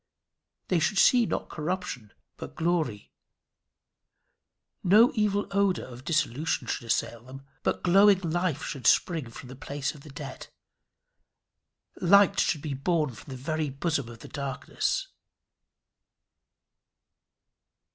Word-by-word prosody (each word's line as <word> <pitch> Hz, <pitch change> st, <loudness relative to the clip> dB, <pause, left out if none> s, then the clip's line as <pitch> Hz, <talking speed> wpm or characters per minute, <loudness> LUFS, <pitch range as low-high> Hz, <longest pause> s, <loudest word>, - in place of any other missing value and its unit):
They 180 Hz, -, +3 dB
should 160 Hz, +6 st, 0 dB
see 240 Hz, +2 st, +5 dB
not -, -, -3 dB
corruption 155 Hz, -, -4 dB, 0.2 s
but -, -, -9 dB
glory. 160 Hz, -11 st, -1 dB, 1.7 s
No 215 Hz, +7 st, +6 dB
evil 210 Hz, -3 st, +1 dB
odour 200 Hz, -2 st, +1 dB
of 125 Hz, 0 st, -11 dB
dissolution 155 Hz, -2 st, 0 dB
should 120 Hz, -, -4 dB
assail 115 Hz, 0 st, -1 dB
them, 135 Hz, +2 st, -11 dB, 0.2 s
but -, -, -1 dB
glowing 195 Hz, +2 st, +6 dB
life 170 Hz, -3 st, -1 dB
should 130 Hz, -6 st, -3 dB
spring 160 Hz, -9 st, +2 dB
from 125 Hz, +2 st, -11 dB
the 130 Hz, -, -9 dB
place 140 Hz, +1 st, -4 dB
of 150 Hz, -, -14 dB
the 150 Hz, -, -13 dB
dead; 140 Hz, -1 st, -8 dB, 1.5 s
light 200 Hz, +2 st, +5 dB
should 150 Hz, -4 st, +1 dB
be 150 Hz, -3 st, -3 dB
born 150 Hz, +1 st, 0 dB
from 110 Hz, +3 st, -13 dB
the 130 Hz, -, -6 dB
very 155 Hz, +3 st, -2 dB
bosom 140 Hz, -2 st, -2 dB
of 115 Hz, -1 st, -12 dB
the -, -, -10 dB
darkness. 140 Hz, -2 st, -3 dB
155 Hz, 125 wpm, -27 LUFS, 130-185 Hz, 1.7 s, No